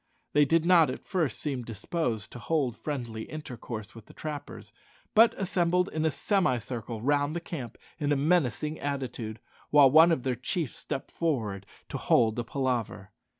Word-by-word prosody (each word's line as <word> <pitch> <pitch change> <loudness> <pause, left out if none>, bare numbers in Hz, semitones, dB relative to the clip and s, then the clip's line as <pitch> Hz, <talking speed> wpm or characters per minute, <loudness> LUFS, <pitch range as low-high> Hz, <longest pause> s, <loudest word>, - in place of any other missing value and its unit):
They 145 0 +5
did 165 +3 +2
not 170 -3 +6
at - - -6
first 160 - -1
seem 140 -4 -2
disposed 115 - -3
to 120 - -8
hold 135 -3 0
friendly 120 -7 -4
intercourse 120 -8 -7
with 115 -2 -13
the - - -16
trappers, 150 -2 -7 0.4
but 225 +1 +5
assembled 180 -1 +1
in 155 0 -2
a - - +4
semicircle 125 - -1
round 145 +3 +1
the - - 0
camp 135 -9 -7 0.2
in 145 -2 0
a - - +4
menacing 150 -1 +1
attitude, 130 -6 -4 0.3
while 145 -3 +7
one 160 +3 +8
of 130 -7 0
their 130 - 0
chiefs 135 +3 -2
stepped 140 -3 -5
forward 110 - -2 0.2
to - - -4
hold 115 -1 +3
a - - -1
palaver. 120 -6 -2
140 Hz, 165 wpm, -28 LUFS, 120-160 Hz, 0.4 s, one